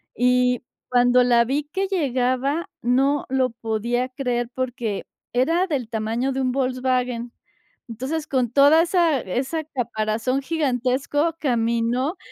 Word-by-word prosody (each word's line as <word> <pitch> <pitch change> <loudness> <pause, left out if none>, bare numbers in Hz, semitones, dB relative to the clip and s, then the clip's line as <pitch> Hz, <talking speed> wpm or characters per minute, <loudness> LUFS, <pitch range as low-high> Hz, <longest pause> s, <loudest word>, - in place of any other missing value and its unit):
Y 250 0 +2 0.3
cuando 245 0 +4
la 240 -1 +4
vi 275 +5 -1
que 380 +6 -2
llegaba, 275 -3 0
no 270 +4 +2
lo 260 -1 +1
podía 235 +2 -2
creer, 250 -2 -2
porque 245 -5 -3 0.3
era 330 +9 +2
del 265 -9 -2
tamaño 225 +4 -1
de 265 - -2
un 255 -1 +1
Volkswagen. 255 -2 -1 0.5
Entonces, 260 +7 -4
con 255 -3 0
toda 285 +5 +6
esa 335 -4 +2
esa 265 - -2
caparazón 240 -2 -2
gigantesco, 280 +1 0
caminó 240 +4 0
255 Hz, 120 wpm, -23 LUFS, 240-280 Hz, 0.5 s, toda